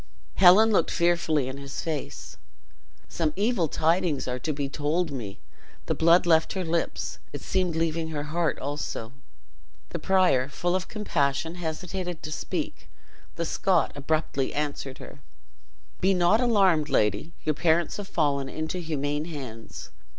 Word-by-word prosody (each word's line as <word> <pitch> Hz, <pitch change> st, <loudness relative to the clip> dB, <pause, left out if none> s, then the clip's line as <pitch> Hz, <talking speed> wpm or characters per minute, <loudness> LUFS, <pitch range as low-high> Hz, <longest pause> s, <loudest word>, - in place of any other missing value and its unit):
Helen 195 Hz, +4 st, +7 dB
looked 205 Hz, -, +3 dB
fearfully 170 Hz, -5 st, +1 dB
in 130 Hz, +1 st, -5 dB
his 140 Hz, 0 st, -6 dB
face. 145 Hz, -, -5 dB, 0.7 s
"Some 155 Hz, -3 st, -1 dB
evil 205 Hz, -3 st, +1 dB
tidings 165 Hz, -2 st, +1 dB
are 125 Hz, 0 st, -2 dB
to 155 Hz, -, -2 dB
be 145 Hz, -1 st, -2 dB
told 150 Hz, +4 st, -1 dB
me." 110 Hz, -8 st, -6 dB, 0.5 s
The -, -, 0 dB
blood 170 Hz, +2 st, +5 dB
left 160 Hz, -2 st, +3 dB
her 190 Hz, -2 st, -2 dB
lips; 165 Hz, +1 st, -2 dB
it -, -, -6 dB
seemed 185 Hz, -3 st, 0 dB
leaving 165 Hz, 0 st, 0 dB
her 150 Hz, -2 st, -3 dB
heart 165 Hz, +2 st, -1 dB
also. 135 Hz, -4 st, -4 dB, 0.8 s
The -, -, -4 dB
prior, 180 Hz, -9 st, +3 dB
full 175 Hz, +5 st, -1 dB
of 185 Hz, 0 st, -2 dB
compassion, 160 Hz, -7 st, -1 dB
hesitated 175 Hz, +1 st, -4 dB
to 155 Hz, -, -5 dB
speak. 155 Hz, -, -4 dB, 0.5 s
The -, -, -2 dB
Scot -, -, +1 dB
abruptly 145 Hz, -2 st, -1 dB
answered 145 Hz, -2 st, -3 dB
her: -, -, -11 dB, 0.8 s
"Be 190 Hz, +1 st, +3 dB
not 180 Hz, +6 st, +4 dB
alarmed, 190 Hz, -10 st, +3 dB
lady, 105 Hz, -, +1 dB
your 155 Hz, -, +1 dB
parents 165 Hz, +2 st, +1 dB
have 205 Hz, -1 st, -6 dB
fallen 140 Hz, -6 st, 0 dB
into 160 Hz, +5 st, -3 dB
humane 150 Hz, -2 st, -2 dB
hands. 130 Hz, -9 st, -8 dB
160 Hz, 145 wpm, -26 LUFS, 145-175 Hz, 0.8 s, Helen